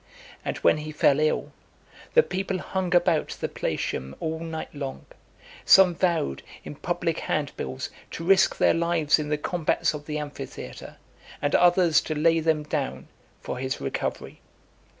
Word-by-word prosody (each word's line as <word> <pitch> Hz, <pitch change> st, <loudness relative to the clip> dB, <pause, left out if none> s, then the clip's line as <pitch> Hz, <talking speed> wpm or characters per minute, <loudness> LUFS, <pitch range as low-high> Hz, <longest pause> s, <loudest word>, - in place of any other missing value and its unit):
And -, -, -3 dB
when -, -, +3 dB
he 155 Hz, 0 st, -6 dB
fell 145 Hz, -1 st, +3 dB
ill, 155 Hz, 0 st, 0 dB, 0.6 s
the 475 Hz, -, +8 dB
people 190 Hz, -, -2 dB
hung 185 Hz, -1 st, -2 dB
about 175 Hz, -3 st, +2 dB
the -, -, -1 dB
Palatium 65 Hz, +1 st, -3 dB
all 160 Hz, 0 st, -3 dB
night 160 Hz, -1 st, -6 dB
long; 140 Hz, -2 st, -6 dB, 0.6 s
some 190 Hz, -2 st, +7 dB
vowed, 165 Hz, -, 0 dB, 0.2 s
in -, -, -7 dB
public -, -, -2 dB
handbills, 65 Hz, 0 st, -3 dB, 0.2 s
to 165 Hz, -, -6 dB
risk 190 Hz, +2 st, +4 dB
their -, -, +4 dB
lives 165 Hz, -2 st, +2 dB
in 150 Hz, -1 st, -3 dB
the 150 Hz, -, +1 dB
combats 165 Hz, 0 st, 0 dB
of 150 Hz, -1 st, -8 dB
the 150 Hz, -1 st, -2 dB
amphitheatre, 150 Hz, -1 st, -8 dB, 0.4 s
and 145 Hz, -, -1 dB
others 175 Hz, -2 st, +5 dB
to 155 Hz, -, -4 dB
lay 165 Hz, +2 st, +3 dB
them 160 Hz, -1 st, +1 dB
down, 65 Hz, -, -3 dB, 0.3 s
for 125 Hz, -, -5 dB
his 130 Hz, 0 st, -3 dB
recovery. 70 Hz, -, -4 dB
155 Hz, 150 wpm, -26 LUFS, 150-175 Hz, 0.6 s, the